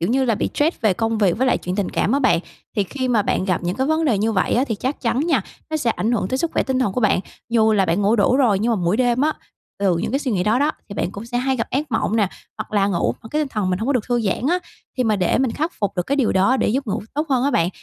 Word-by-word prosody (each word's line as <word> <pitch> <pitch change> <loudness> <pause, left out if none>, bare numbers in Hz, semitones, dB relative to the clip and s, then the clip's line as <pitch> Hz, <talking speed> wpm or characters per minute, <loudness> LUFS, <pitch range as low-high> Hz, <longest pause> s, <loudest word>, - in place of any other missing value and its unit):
kiểu 170 - 0
như 260 +3 +2
là, 230 - +2
bị - - -1
stress 310 +4 0
về 215 -3 +3
công 225 +2 -1
việc 200 -2 +2
với 260 - +2
lại 255 - +2
chuyện 180 +1 -4
tình 200 -3 -1
cảm 215 - 0
á 280 - +3
bạn. 255 -10 +3 0.4
Thì 205 - +2
khi 260 +5 -3
mà 230 -4 +3
bạn 185 - 0
gặp 185 -2 0
những 175 +2 -2
cái 265 - 0
vấn 315 +2 +1
đề 235 -10 +2
như 220 +2 +1
vậy 195 - +1
á, 250 - +3
thì 230 -6 -2
chắc 260 +7 -3
chắn 240 +1 0
nha, 345 - +2 0.3
nó 315 - 0
sẽ 255 -6 0
ảnh 225 +1 -1
hưởng 205 -5 0
tới 260 - -1
sức 335 +3 -1
khỏe - - +1
tinh 265 -1 -1
thần 250 -7 +1
của 250 - -1
bạn. 215 -5 +3 0.3
Dù 220 -2 +3
là 200 -2 +3
bạn 180 +5 +1
ngủ 210 +4 +3
đủ 225 +4 +3
rồi 235 -8 +3
nhưng 230 +4 +1
mà - - +1
mỗi 175 +5 +2
đêm 245 0 +2
á, 310 +2 +2 0.5
từ 195 -3 +2
những 170 - -2
cái 275 - +2
suy 270 -4 -3
nghĩ 185 -3 +1
đó 215 +4 +2
đó, 290 +3 +2 0.2
thì 200 - -7
bạn 185 - -2
cũng 200 +4 -8
sẽ 245 +1 -2
hay 265 +1 0
gặp 230 - -3
ác 285 +3 -2
mộng 225 0 0
nè, 205 -4 +2 0.3
hoặc - - -6
là 200 -2 +3
ngủ 185 -4 0
mà 220 - -10
cái 305 - 0
tinh 295 - -3
thần 210 -7 -1
mình 180 - 0
hông 220 - -3
có 280 - +2
được 250 -6 0
thư 240 -1 +1
giãn 220 +3 -1
á. 355 - +2 0.4
Thì 255 - +2
mà 215 -2 +2
để 185 +2 +1
mình 260 -2 +1
khắc 315 +8 -2
phục 200 -1 -1
được 180 - +1
cái 280 - 0
điều 265 -6 +2
đó 195 +8 +3
để - - +1
giúp 270 +5 -1
ngủ 205 - -2
tốt 300 +2 -1
hơn 255 -1 +2
á 285 - +2
bạn, 170 -9 +2
230 Hz, 335 wpm, -21 LUFS, 200-265 Hz, 0.5 s, về